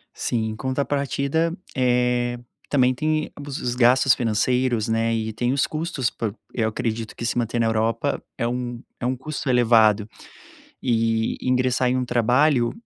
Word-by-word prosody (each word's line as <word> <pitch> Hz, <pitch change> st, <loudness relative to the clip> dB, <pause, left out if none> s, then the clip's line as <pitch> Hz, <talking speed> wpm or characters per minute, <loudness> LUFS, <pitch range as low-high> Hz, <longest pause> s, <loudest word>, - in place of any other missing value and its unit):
Sim, 110 Hz, -2 st, -1 dB
em 110 Hz, -, -5 dB
contrapartida, 140 Hz, +5 st, -1 dB, 0.2 s
eh, 125 Hz, -1 st, +1 dB, 0.3 s
também 130 Hz, -3 st, +3 dB
tem 155 Hz, +3 st, -1 dB, 0.2 s
os 125 Hz, -3 st, -3 dB
gastos 125 Hz, +2 st, +5 dB
financeiros, 120 Hz, +1 st, +1 dB
né, 115 Hz, 0 st, +1 dB
e 110 Hz, -1 st, -2 dB
tem 120 Hz, +3 st, 0 dB
os 140 Hz, -, +2 dB
custos 155 Hz, -5 st, -2 dB
pra 110 Hz, -3 st, -3 dB, 0.2 s
eu 110 Hz, -2 st, 0 dB
acredito 110 Hz, -1 st, -3 dB
que 115 Hz, -, -5 dB
se 115 Hz, -, -1 dB
manter 120 Hz, 0 st, -1 dB
na 115 Hz, -, +2 dB
Europa 115 Hz, 0 st, 0 dB, 0.2 s
é 115 Hz, -, 0 dB
um 120 Hz, 0 st, -4 dB, 0.2 s
é -, -, -4 dB
um 130 Hz, +1 st, 0 dB
custo 145 Hz, +2 st, -5 dB
elevado, 110 Hz, -4 st, +4 dB, 0.7 s
e 115 Hz, -2 st, +1 dB
ingressar 125 Hz, 0 st, +1 dB
em 130 Hz, -, +1 dB
um 130 Hz, -, -1 dB
trabalho, 120 Hz, +2 st, +2 dB
125 Hz, 155 wpm, -23 LUFS, 115-130 Hz, 0.7 s, gastos